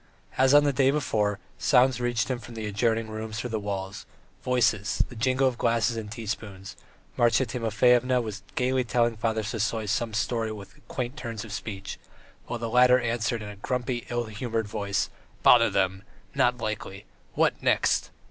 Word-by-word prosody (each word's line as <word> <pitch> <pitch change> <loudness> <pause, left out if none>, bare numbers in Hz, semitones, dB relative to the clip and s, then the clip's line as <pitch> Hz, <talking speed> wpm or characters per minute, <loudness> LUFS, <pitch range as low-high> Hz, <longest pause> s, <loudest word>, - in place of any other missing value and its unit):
As 130 +2 +4
on 145 - +7
the 145 -1 +2
day 135 +1 +3
before, 110 -8 0 0.2
sounds 125 -2 +3
reached 120 -2 0
him 130 -2 -2
from 120 -1 -11
the 110 -1 -4
adjoining 110 +2 0
rooms 110 0 -6
through 125 +2 -4
the 110 - -1
walls, 100 -1 -5 0.3
voices, 110 -5 +1
the 125 - -11
jingle 130 +3 +2
of 125 -2 -2
glasses 115 0 +1
and 110 -2 -6
teaspoons.... 105 -3 -6 0.4
Marya 120 +2 +3
Timofyevna 125 +2 +2
was 110 -3 -5
gaily 130 0 +1
telling 120 0 +1
Father 110 0 -1
Sisoy 110 0 -2
some 115 +1 -1
story 110 0 -1
with 100 -2 -10
quaint 130 +2 -4
turns 115 -7 -5
of 105 - -8
speech, 100 -3 -6 0.5
while 120 - -3
the 115 0 -4
latter 125 +2 +5
answered 120 -1 -1
in 105 - -7
a 105 - -10
grumpy, 125 +2 -3
ill 120 0 -1
humoured 110 0 -3
voice: 100 -1 -2 0.3
"Bother 115 -1 +7
them! 95 0 0 0.3
Not 125 0 +2
likely! 105 -3 -5 0.3
What - - +2
next!" - - +2
115 Hz, 170 wpm, -27 LUFS, 105-125 Hz, 0.5 s, on